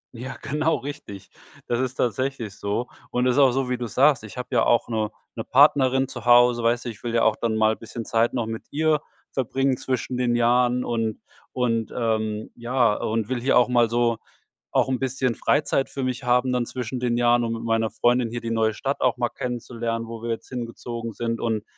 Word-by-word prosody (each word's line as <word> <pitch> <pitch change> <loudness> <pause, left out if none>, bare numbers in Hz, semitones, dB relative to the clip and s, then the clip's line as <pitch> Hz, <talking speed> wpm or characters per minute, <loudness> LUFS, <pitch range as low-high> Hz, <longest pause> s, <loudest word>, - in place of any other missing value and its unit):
Ja, 130 +3 -7
genau 155 +3 +1
richtig. 120 -9 -8 0.4
Das 120 - 0
ist 130 0 -2
tatsächlich 120 -3 -2
so. 105 +5 -2 0.2
Und 125 0 0
es 125 - +3
ist - - +3
auch 135 -2 +6
so, 135 +1 -1
wie 125 - 0
du's 120 -4 -5
sagst. 135 -3 +4
Ich 110 +2 -10
habe 125 - -5
ja 120 -3 +3
auch 120 -1 +3
'ne 110 -2 -1 0.3
'ne - - -4
Partnerin 135 -1 +4
zu 120 -3 -8
Hause, 120 0 +6
weißt 120 +1 +1
du, - - -2
ich 110 -1 -10
will 120 -1 -2
ja 115 - +3
auch 110 - +4
dann 115 -1 -1
mal 110 0 +3
bisschen 115 0 -8
Zeit 115 +2 +1
noch 120 -3 0
mit 110 0 -5
ihr 155 0 +2 0.3
verbringen 135 +1 0
zwischen 130 0 -3
den 125 -1 +1
Jahren 125 +1 +2
und 115 -2 -2 0.3
und 115 -3 -1
ähm, 110 -2 -1
ja. 120 -2 +2
Und 110 0 -2
will 125 -1 -2
hier 135 +2 +3
auch 125 0 +4
mal 120 -2 +3
so 120 0 +1 0.5
auch - - +2
'n 130 -2 0
bisschen 130 -1 0
Freizeit 140 +2 +1
für 135 - -4
mich 130 +1 -2
haben 125 +1 +2
dann 125 -1 0
zwischen 125 0 -4
den 120 -1 0
Jahren, 120 0 +3
um 115 - -1
mit 115 0 -5
meiner 115 -1 +1
Freundin 120 +2 +1
hier 120 +1 -5
die 115 - -4
neue 110 -1 +1
Stadt 140 +3 -3
auch 125 -1 +2
mal 120 -1 0
kennenzulernen, 115 -2 -4
wo 115 -1 -7
wir 120 - -4
jetzt 115 - -5
hingezogen 115 -2 -5
sind. 115 0 -3
Und 110 -3 -1
120 Hz, 220 wpm, -24 LUFS, 115-125 Hz, 0.5 s, auch